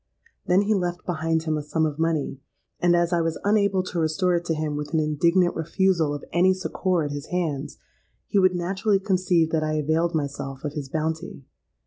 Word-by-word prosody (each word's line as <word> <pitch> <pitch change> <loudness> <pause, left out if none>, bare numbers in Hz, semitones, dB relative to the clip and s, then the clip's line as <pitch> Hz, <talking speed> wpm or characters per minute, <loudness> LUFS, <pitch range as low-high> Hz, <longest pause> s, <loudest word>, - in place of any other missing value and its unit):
Then 185 +3 +4
he 215 +2 +2
left 180 -3 -2
behind 160 -2 -1
him 155 -1 -1
a - - -2
sum 160 +2 0
of 150 -1 -3
money; 160 -4 -1 0.4
and, 175 0 +3
as 175 0 +1
I 170 - +3
was 165 -1 -2
unable 200 -2 +2
to 180 -2 -4
restore 165 +3 +1
it 170 0 -2
to 165 - 0
him 155 -1 -2
with 150 +2 -4
an - - +3
indignant 170 +4 +2
refusal 170 -1 +1
of 145 - -8
any 185 +2 +4
succour 185 -2 -1
at 145 - -3
his 145 0 -6
hands, 155 -6 -2 0.5
he 205 - +1
would 185 -1 +4
naturally 195 +4 +1
conceive 180 -4 +1
that 160 - +1
I 155 0 -1
availed 160 +3 +1
myself 140 -2 -4
of 150 -1 -3
his 145 -3 -5
bounty. 160 -1 -3
165 Hz, 200 wpm, -24 LUFS, 155-180 Hz, 0.5 s, Then